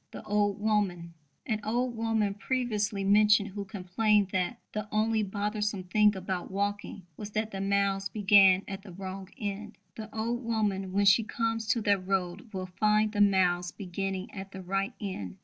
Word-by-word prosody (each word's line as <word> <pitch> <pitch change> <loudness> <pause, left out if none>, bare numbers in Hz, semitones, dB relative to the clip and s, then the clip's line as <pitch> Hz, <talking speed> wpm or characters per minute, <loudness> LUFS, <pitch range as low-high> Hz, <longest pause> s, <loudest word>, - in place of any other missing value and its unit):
The - - -9
old 205 -1 0
woman 195 -6 0 0.3
an 215 -3 -1
old 240 +2 -1
woman 225 -3 0
previously 210 -3 -1
mentioned 210 +1 +4
who 200 +1 -6
complained 200 +2 +1
that 190 +6 -1
"the 215 0 -4
only 220 +1 +2
bothersome 210 0 -2
thing 210 +3 +3
about 185 -1 -4
walking 200 -1 -3
was 210 - -6
that 215 +1 -1
the 195 - -4
miles 195 0 +1
began 195 -2 +5
at 195 0 -6
the 195 -2 -12
wrong 190 +1 -7
end" 210 +1 -5 0.2
the 220 -1 -8
old 235 +3 -2
woman 205 -5 -1
when 200 +1 +2
she 205 +3 +6
comes 225 0 -2
to 235 0 +1
that 205 -2 +2
road 190 +2 -2
will 190 -2 -4
find 215 0 +3
the 205 -1 0
miles 180 -3 +3
beginning 190 0 -4
at 195 -1 -8
the 190 - -7
right 195 +2 -1
end. 100 - -5
205 Hz, 170 wpm, -29 LUFS, 190-215 Hz, 0.3 s, she